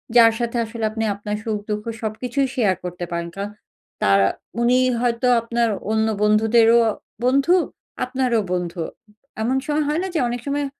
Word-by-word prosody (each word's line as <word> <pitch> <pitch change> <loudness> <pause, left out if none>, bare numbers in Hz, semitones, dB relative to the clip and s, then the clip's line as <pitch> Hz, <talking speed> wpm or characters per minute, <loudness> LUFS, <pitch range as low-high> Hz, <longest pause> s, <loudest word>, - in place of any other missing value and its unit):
যার 230 -1 +8
সাথে 235 0 -1
আসলে 225 0 -7
আপনি 225 0 -3
আপনার 210 +1 -4
সুখ-দুঃখ 210 -1 -3 0.2
সবকিছুই 245 +5 -1
শেয়ার 210 -7 +2
করতে 180 0 -5
পারেন। 170 0 -3
কারণ 200 +1 -4 0.5
তারা 100 0 +5 0.3
উনি 245 +1 +4 0.2
হয়তো 245 0 +1
আপনার 235 0 0 0.2
অন্য 220 0 +2 0.2
বন্ধুদেরও 225 +2 +5 0.5
বন্ধু, 275 +8 +4 0.5
আপনারও 255 -2 0
বন্ধু। 175 -1 -3 0.6
এমন 245 +4 +1
স - - -14 0.2
হয় 305 +3 0
না? - - -2
যে - - +2
অনেক 240 0 -3
সময়, 285 +1 0
225 Hz, 150 wpm, -22 LUFS, 210-245 Hz, 0.6 s, যার